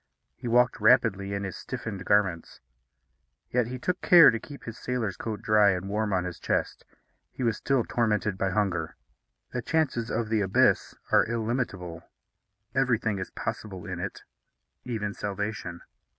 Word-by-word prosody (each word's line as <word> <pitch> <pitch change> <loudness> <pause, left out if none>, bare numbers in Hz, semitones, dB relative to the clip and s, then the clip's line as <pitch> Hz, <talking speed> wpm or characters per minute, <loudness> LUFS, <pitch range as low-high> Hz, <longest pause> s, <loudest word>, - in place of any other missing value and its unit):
He 125 - -7
walked 125 +1 +3
rapidly 100 -6 +4
in 100 - -3
his 95 - -5
stiffened 110 -7 -6
garments; 95 -5 +1 0.9
yet 125 -2 +2
he 130 +1 -5
took 180 +8 -2
care 175 - +8
to 115 - -3
keep 140 +4 -11
his 115 -1 -8
sailor's 120 -7 -2
coat 110 -3 -5
dry 105 -1 +5
and 90 +1 -4
warm 105 +1 -1
on 95 -2 +1
his 90 -1 -6
chest. - - -1 0.5
He 130 - -6
was 115 -2 +1
still 135 -3 +1
tormented 105 -4 0
by 95 0 0
hunger. 95 -5 -1 0.6
The 125 - -1
chances 130 -6 0
of 115 -1 -1
the 110 -2 +2
abyss 95 -1 +2 0.2
are - - +5
illimitable. 110 -8 -2 0.7
Everything 120 -5 +1
is 95 - -4
possible 95 -5 -5
in - - -5
it, - - -5 0.6
even 105 -4 -3
salvation. 105 -4 -4
110 Hz, 155 wpm, -27 LUFS, 100-120 Hz, 0.9 s, care